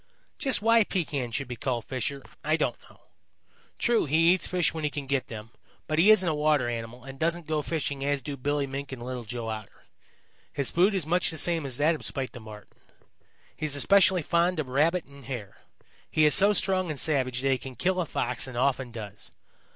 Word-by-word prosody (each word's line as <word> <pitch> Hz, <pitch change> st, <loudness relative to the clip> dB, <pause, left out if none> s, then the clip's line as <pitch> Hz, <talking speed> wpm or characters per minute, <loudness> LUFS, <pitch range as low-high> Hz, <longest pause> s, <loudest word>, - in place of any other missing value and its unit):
"Just 265 Hz, -6 st, +1 dB
why 230 Hz, 0 st, +6 dB
Pekan 145 Hz, -10 st, -2 dB
should 130 Hz, +3 st, -3 dB
be 125 Hz, -, -5 dB
called 120 Hz, -1 st, -2 dB
Fisher, 135 Hz, +2 st, -3 dB, 0.2 s
I 155 Hz, +1 st, +2 dB
don't 125 Hz, -6 st, 0 dB
know. -, -, -21 dB, 0.8 s
True, 235 Hz, -1 st, +2 dB
he 165 Hz, +4 st, +4 dB
eats 185 Hz, -, -2 dB
fish 180 Hz, -4 st, +1 dB
when 160 Hz, -1 st, -5 dB
he 150 Hz, -, +1 dB
can 145 Hz, -1 st, -5 dB
get 135 Hz, -1 st, -1 dB
them, 110 Hz, 0 st, -9 dB, 0.4 s
but 155 Hz, 0 st, 0 dB
he 190 Hz, +6 st, +6 dB
isn't 215 Hz, -4 st, +6 dB
a 160 Hz, -, +2 dB
water 150 Hz, -4 st, +2 dB
animal 120 Hz, +1 st, -5 dB
and 135 Hz, 0 st, -10 dB
doesn't 170 Hz, +1 st, 0 dB
go 155 Hz, -1 st, -1 dB
fishing 145 Hz, -3 st, -3 dB
as 140 Hz, -1 st, 0 dB
do 140 Hz, +2 st, -4 dB
Billy 145 Hz, +2 st, -1 dB
Mink 135 Hz, +1 st, -6 dB
and 125 Hz, -3 st, -7 dB
Little 125 Hz, -1 st, -5 dB
Joe 115 Hz, 0 st, -5 dB
Otter. 110 Hz, -2 st, -7 dB, 0.7 s
His 140 Hz, -2 st, 0 dB
food 190 Hz, +4 st, +3 dB
is 185 Hz, -6 st, -1 dB
much 175 Hz, +3 st, +2 dB
the 160 Hz, -, -5 dB
same 165 Hz, -4 st, +1 dB
as 125 Hz, -2 st, -2 dB
that 155 Hz, +3 st, +3 dB
of 155 Hz, -, -7 dB
Spite 135 Hz, -2 st, -3 dB
the 120 Hz, -, -10 dB
Marten. 105 Hz, -2 st, -13 dB, 0.8 s
He 155 Hz, -, -3 dB
is 145 Hz, -, +2 dB
especially 190 Hz, +2 st, +4 dB
fond 170 Hz, +2 st, +1 dB
of 140 Hz, -4 st, -3 dB
Rabbit 160 Hz, +7 st, +2 dB
and 140 Hz, -1 st, -15 dB
Hare. 110 Hz, -6 st, -6 dB, 0.5 s
He 155 Hz, -, +3 dB
is 150 Hz, -, +5 dB
so 200 Hz, +2 st, +6 dB
strong 190 Hz, -2 st, +2 dB
and 150 Hz, -3 st, -3 dB
savage 130 Hz, -5 st, 0 dB
that 135 Hz, 0 st, +1 dB
he 130 Hz, -, +1 dB
can 130 Hz, -1 st, -9 dB
kill 185 Hz, +4 st, 0 dB
a 170 Hz, -, -3 dB
Fox 125 Hz, -1 st, -2 dB
and 130 Hz, -2 st, -7 dB
often 130 Hz, 0 st, +1 dB
does. 105 Hz, -3 st, -8 dB
145 Hz, 220 wpm, -27 LUFS, 125-165 Hz, 0.8 s, why